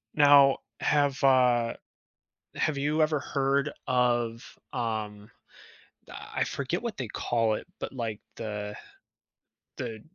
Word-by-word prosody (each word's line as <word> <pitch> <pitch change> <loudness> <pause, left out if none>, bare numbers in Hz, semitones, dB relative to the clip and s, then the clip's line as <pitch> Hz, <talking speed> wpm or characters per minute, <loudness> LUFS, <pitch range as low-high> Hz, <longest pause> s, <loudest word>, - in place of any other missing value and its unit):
Now, 140 -2 +7 0.2
have, 145 -3 +1
uh 125 -3 +4 0.8
have 155 -2 0
you 150 +3 0
ever 155 -1 +2
heard 140 +1 0
of, 120 -2 +1 0.3
um, 110 -4 -3 0.8
I - - -4
forget 140 - -3
what 235 -4 -4
they 130 - -4
call 115 0 0
it, - - -5
but - - -5
like 115 -5 -4 0.2
the 105 -2 -5 1.0
the 110 -1 -5
125 Hz, 110 wpm, -28 LUFS, 115-140 Hz, 1.0 s, Now